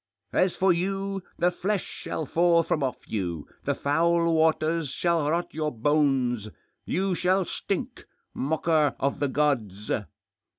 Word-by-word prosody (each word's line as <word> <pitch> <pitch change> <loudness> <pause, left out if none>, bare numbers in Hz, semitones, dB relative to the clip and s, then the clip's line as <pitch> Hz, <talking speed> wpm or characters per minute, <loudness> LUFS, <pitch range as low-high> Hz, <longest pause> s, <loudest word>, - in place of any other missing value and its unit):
As 185 -1 +2
for 190 -1 +4
you, 195 +2 -2 0.2
the 175 +1 +3
flesh 195 +2 -1
shall 160 - -5
fall 170 +2 +3
from 155 - -1
off 130 -2 -1
you; 85 -7 -3 0.2
the - - +1
foul 170 +3 +2
waters 160 -1 +2
shall 165 0 +1
rot 170 +2 -1
your 155 -1 -1
bones; 130 -4 +1 0.4
you 190 +1 0
shall 185 +2 +2
stink! - - -4 0.3
Mocker 155 -1 +1
of 140 +1 0
the 145 - +1
gods 120 -9 0
160 Hz, 135 wpm, -26 LUFS, 140-175 Hz, 0.4 s, for